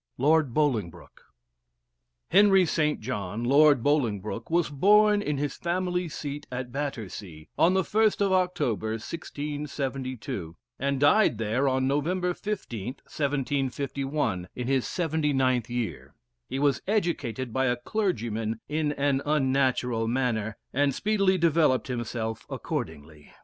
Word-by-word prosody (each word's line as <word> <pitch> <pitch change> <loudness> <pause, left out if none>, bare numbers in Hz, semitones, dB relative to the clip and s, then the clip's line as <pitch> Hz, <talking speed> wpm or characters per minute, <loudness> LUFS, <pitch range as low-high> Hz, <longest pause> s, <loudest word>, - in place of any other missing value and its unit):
LORD 150 +1 +3
BOLINGBROKE. 110 - -2 1.1
Henry 195 -1 +6
St. 150 -2 0
John, 105 -2 -4
Lord 140 0 +5
Bolingbroke, 115 -7 0
was 170 -2 +1
born 210 +7 +5
in 150 -7 -2
his 145 0 -2
family 180 0 -1
seat 145 -1 -6
at 125 0 -4
Battersea, 105 - -6
on 180 +3 +4
the 190 - +3
1st 215 +3 +2
of 200 -1 +2
October 130 - 0
1672, 135 - -5 0.2
and 140 0 0
died 145 - +4
there 115 +5 0
on 130 0 +1
November 175 +6 0
15th, 130 - -5
1751, 135 -6 -2
in 125 - -4
his 135 -2 +1
79th 140 - 0
year. 85 - -4 0.3
He - - -3
was 140 -2 +2
educated 140 - -1
by 130 0 +1
a 125 - +2
clergyman 115 - -2
in 150 -1 0
an 140 -1 +1
unnatural 130 -5 +1
manner, 115 -4 -1 0.2
and 140 0 +2
speedily 195 -1 +2
developed 160 -6 +2
himself 115 -2 -4
accordingly. 75 0 -6
135 Hz, 120 wpm, -27 LUFS, 120-160 Hz, 1.1 s, Henry